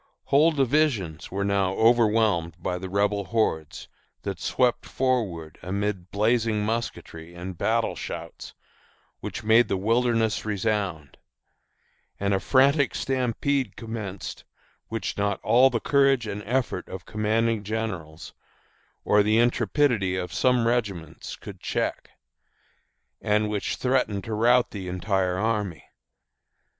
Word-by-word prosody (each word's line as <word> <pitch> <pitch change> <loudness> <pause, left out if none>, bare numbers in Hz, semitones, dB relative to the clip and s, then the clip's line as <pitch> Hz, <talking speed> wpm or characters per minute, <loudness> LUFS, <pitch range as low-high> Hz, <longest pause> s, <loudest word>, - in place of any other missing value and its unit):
Whole 150 +4 +4
divisions 130 - 0
were 100 +1 -2
now 100 -2 +1
overwhelmed 110 -7 +3
by 90 +1 -3
the 95 +1 -6
Rebel 100 +1 +1
hordes, 90 -10 -1 0.4
that - - -4
swept 125 -2 +1
forward 105 - -2
amid 95 0 -3
blazing 110 0 +1
musketry 85 -7 -4
and 90 +1 -6
battle - - 0
shouts - - -7 0.6
which - - -6
made 110 +2 +5
the 95 - 0
wilderness 115 +2 +1
resound; 100 - -2 1.0
and 100 0 0
a 95 - +2
frantic 140 +4 +3
stampede 130 -1 -1
commenced 110 -4 -6 0.4
which 115 -2 -4
not 100 -1 0
all 125 +3 +5
the 120 -3 -1
courage 135 -2 +3
and 105 -1 -4
effort 125 +1 -1
of 95 -1 -8
commanding 110 +1 0
generals, 95 -8 -5 0.7
or 105 - +5
the 105 +2 +2
intrepidity 120 -3 +2
of 90 -2 -4
some 125 -2 +2
regiments 100 -9 -2
could - - -10
check, - - -2 1.1
and 105 0 +1
which 105 -2 -2
threatened 125 -6 0
to 110 - -5
rout 120 +3 +3
the 95 -3 -6
entire 90 0 0
army. 105 -4 -1
105 Hz, 120 wpm, -25 LUFS, 95-120 Hz, 1.1 s, made